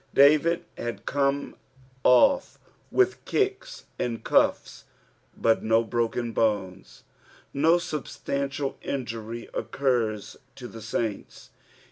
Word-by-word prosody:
David 150 +4 +5
had 120 0 -5
coine 140 0 0 0.5
oS 275 - +4 0.3
with 385 -1 +2
kicks 415 +5 -2
and 115 -2 -3
cufia, - - +2 0.6
but 115 -1 +2
no 115 +1 +3
broken 120 +1 -1
bones. 100 -5 -2 0.5
No 160 +5 +4
substantial 140 -3 -3
injury 115 -3 -5
occurs 110 -6 -1 0.2
to 125 -2 -8
the 115 - -10
saints. 110 -1 -4
125 Hz, 95 wpm, -26 LUFS, 115-145 Hz, 0.6 s, David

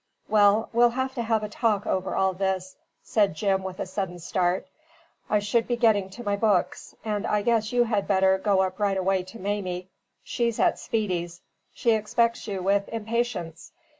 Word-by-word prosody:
"Well, 210 +1 +4
we'll 240 +1 +5
have 260 +2 -2
to 250 - -3
have 225 -2 0
a - - -2
talk 210 -1 0
over 190 0 -1
all 190 0 +2
this," 185 0 -2 0.3
said 205 -7 +1
Jim 195 +2 +1
with 190 -1 -7
a - - -2
sudden 185 -1 -4
start. 180 +1 -1 0.6
"I 210 - +3
should 210 +3 0
be 245 - 0
getting 215 -5 +3
to 240 +6 -9
my 205 -2 0
books; 200 -3 0
and 210 -1 -2
I 210 -1 +1
guess 220 -1 +1
you 245 -1 +3
had 215 -4 -1
better 190 -1 +3
go 195 -1 +2
up 185 +1 -4
right 200 -2 +1
away 190 0 +1
to 185 +5 -11
Mamie. 190 -3 -3 0.3
She's 235 -2 -1
at - - +2
Speedy's. 180 -7 -2 0.3
She 235 - +2
expects 230 +2 +1
you 195 -3 -3
with 200 +1 +1
impatience. 225 - -3
205 Hz, 185 wpm, -26 LUFS, 190-225 Hz, 0.6 s, we'll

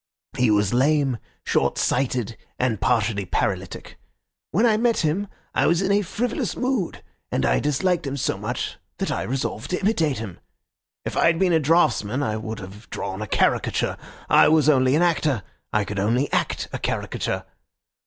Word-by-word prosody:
He 125 -2 +3
was 105 0 +2
lame, 135 -1 +2 0.3
shortsighted, 125 -3 0 0.2
and 125 -5 0
partially 105 -2 +1
paralytic. 95 -1 -3 0.5
When 210 +10 +2
I 225 -2 +4
met 230 +1 +2
him 170 +6 0 0.3
I - - +2
was 170 +3 +2
in 195 - +1
a 205 +1 +4
frivolous 220 +5 -2
mood, 250 -8 -1 0.3
and 65 - +1
I - - +3
disliked 160 +3 0
him 135 +1 -3
so - - 0
much - - -4 0.2
that - - -2
I - - -1
resolved 125 -3 -3
to 180 - -1
imitate 165 - +1
him. 105 -5 -7 0.7
If - - -4
I - - +4
had 165 0 +3
been 180 0 +2
a 160 - +5
draughtsman 145 -6 +2
I 110 -5 -1
would 110 0 -5
have 100 +2 -11
drawn 95 +2 -4
a 110 - -4
caricature. - - +1 0.3
I - - +6
was 155 -1 +4
only 130 -2 +4
an 165 - +3
actor, 155 - +1 0.3
I 105 -1 +1
could 100 0 -4
only 120 +8 +1
act - - 0
a - - -3
caricature. - - -2
135 Hz, 175 wpm, -23 LUFS, 110-170 Hz, 0.7 s, I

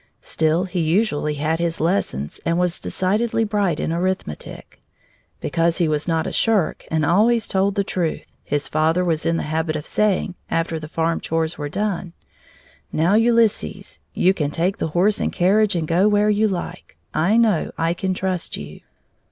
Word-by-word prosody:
Still 160 +2 +1
he 185 -1 -3
usually 160 -3 +1
had 155 +3 -1
his 170 -1 -1
lessons 155 - -1
and 170 0 0
was 180 -1 0
decidedly 220 +5 0
bright 205 -7 0
in 165 - -1
arithmetic. 180 - -4 0.6
Because 165 +2 0
he 170 - +2
was 150 0 -1
not 165 -1 0
a - - -3
shirk 215 -7 +1
and 160 -1 +1
always 220 +7 +3
told 195 +1 +1
the 200 - +1
truth, 175 -4 -2 0.2
his 145 0 -2
father 160 +4 +1
was 165 -2 0
in 165 0 +1
the - - -2
habit 155 +1 -1
of 150 0 -4
saying, 200 -3 0 0.2
after 165 -1 -1
the 155 - -8
farm 165 +1 -1
chores 165 0 -2
were 145 0 -3
done: 190 -1 -2 0.8
"Now, 165 +5 +2
Ulysses, 225 -3 +1 0.2
you 185 +2 +4
can 150 -6 -1
take 175 +6 -1
the - - 0
horse 205 +4 +3
and - - 0
carriage 200 +3 +2
and 165 -2 -1
go 175 +5 +3
where 210 0 +3
you 210 +1 +2
like. 185 -4 -6 0.2
I 175 +8 +2
know 220 -8 +2
I 165 +1 +1
can 185 +1 -2
trust 185 -2 -2
you." 75 +1 -9
175 Hz, 175 wpm, -21 LUFS, 160-200 Hz, 0.8 s, you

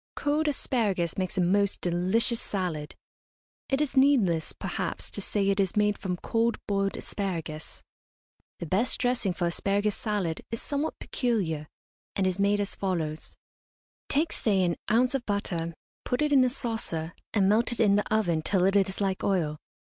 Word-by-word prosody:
Cold 300 +2 +1
asparagus 210 - 0
makes 185 -1 -3
a - - +3
most 200 +3 +2
delicious 185 +7 +1
salad. 175 -7 -3 0.7
It 270 +1 +1
is 295 -3 -1
needless, 225 - +4
perhaps, 185 -2 -4
to 200 - -4
say 200 0 0
it 195 0 +2
is 190 -3 +1
made 210 0 +3
from 180 -3 -3
cold 230 +5 0
boiled 195 -1 0
asparagus. 165 -6 -5 0.7
The - - -5
best 195 +9 +1
dressing 245 -6 +1
for 175 0 -2
asparagus 200 +4 +1
salad 200 -7 -2
is 230 - -3
somewhat 290 +2 -2
peculiar, 185 - -1 0.5
and 195 - +1
is 185 0 0
made 200 +1 +3
as 205 -1 -1
follows: 160 -5 -3 0.7
Take, 305 +4 +1
say, 195 -4 +2
an 170 -2 +1
ounce 245 +3 +3
of 270 -3 -1
butter, 170 -5 -2 0.3
put 250 +4 0
it 300 -1 +1
in 265 -2 +7
a 255 - +3
saucer, 225 -10 -3 0.2
and 200 -3 +3
melt 220 +5 +3
it 240 - -4
in 205 -3 +5
the 205 - 0
oven 175 -7 +2
till 185 +2 +2
it 195 +1 +2
is 195 0 +2
like 190 -1 0
oil. 160 -6 0
200 Hz, 170 wpm, -28 LUFS, 180-230 Hz, 0.7 s, in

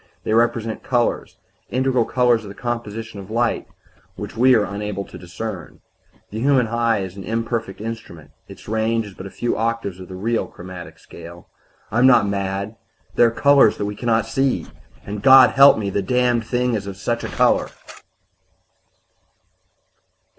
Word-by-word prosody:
They 110 - -1
represent 115 -1 +1
colors 120 -2 -1 0.3
integral 130 -1 +1
colors 120 -2 +2
in 105 - -10
the 100 - -10
composition 115 -3 -5
of 95 0 -10
light 115 +1 -1 0.5
which - - -7
we 125 +2 +5
are 110 - +3
unable 100 -1 -4
to - - -14
discern. 90 0 -7 0.5
The 110 - -5
human 130 0 +3
eye 115 -2 0
is 95 -1 -8
an 100 - -7
imperfect 115 -2 -3
instrument; 110 -8 -8 0.2
its - - -13
range 110 +1 0
is 100 - -11
but 95 +1 -9
a - - -9
few 120 +4 -2
octaves 115 -5 -2
of 90 - -9
the 95 - -9
real 115 +5 -1
'chromatic 90 -3 -10
scale' 85 +1 -13 0.4
I 115 - +1
am 130 - +6
not 120 -5 +5
mad; 100 +2 -3 0.4
there 120 - +5
are - - +2
colors 140 -1 +4
that 100 - -2
we 105 0 -4
can 120 - -6
not 115 -1 +2
see. 135 +4 0 0.4
"And, 100 0 -5
God 130 -1 +8
help 140 +1 +7
me! 100 -2 -3
the 100 - 0
Damned 120 +2 +1
Thing 125 0 0
is 100 -3 -3
of 95 -1 -7
such 115 +4 -2
a - - -3
color!" - - +2
115 Hz, 175 wpm, -21 LUFS, 100-120 Hz, 0.5 s, God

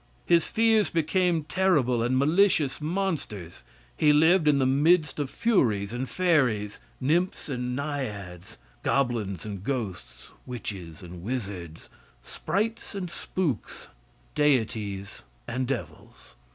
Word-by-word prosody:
His 170 -2 +4
fears 225 -2 +3
became 165 0 +1
terrible 150 -9 +2
and 125 +2 +1
malicious 155 -1 +3
monsters. 150 - -3 0.3
He 150 - +4
lived 160 +3 +4
in 145 -2 +5
the 135 - +2
midst 150 +4 +3
of 145 -3 -1
furies 115 - +1
and 125 +2 -3
fairies, 130 - +1 0.2
nymphs 165 +6 0
and 125 -2 -2
naiads, 105 - -5 0.2
goblins 115 - 0
and 100 -3 -6
ghosts, 110 -8 -5 0.2
witches 95 -9 -6
and 90 0 -9
wizards, 95 -7 -5 0.4
sprites 220 +2 -3
and 180 -3 -4
spooks, 165 - -3 0.4
deities 110 -8 0 0.3
and 125 +2 -2
devils. 135 -4 -6
135 Hz, 110 wpm, -27 LUFS, 105-165 Hz, 0.4 s, in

